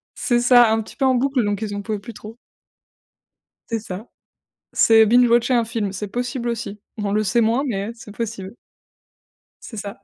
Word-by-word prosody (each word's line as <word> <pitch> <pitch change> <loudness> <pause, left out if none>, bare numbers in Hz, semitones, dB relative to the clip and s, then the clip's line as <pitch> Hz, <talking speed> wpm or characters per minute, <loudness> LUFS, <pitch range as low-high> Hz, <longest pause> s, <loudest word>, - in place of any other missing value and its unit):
c'est 240 -2 +1
ça, 245 -2 +6
un 225 0 +1
petit - - -13
peu 275 - 0
en 260 -1 +3
boucle 265 0 +1
donc 205 0 -2
ils 205 -2 -4
en 205 - -4
pouvaient 215 +1 -3
plus 215 +4 -10
trop. 215 +2 -11 1.3
C'est 230 -1 -1
ça. 205 +1 -8 0.7
C'est 225 -1 +5
binge-watcher 240 +2 +4
un 235 -1 +3
film, 220 -4 -3
c'est 205 +1 -5
possible 245 +2 -3
aussi. 215 -3 -5 0.2
On 205 -1 -2
le 215 +1 +2
sait 215 +4 +2
moins, 230 +4 +2
mais 205 -4 -3
c'est 215 -3 -13
possible. 215 -3 -6 1.1
C'est 225 - -9
ça. 200 0 -7
225 Hz, 185 wpm, -21 LUFS, 205-240 Hz, 1.3 s, ça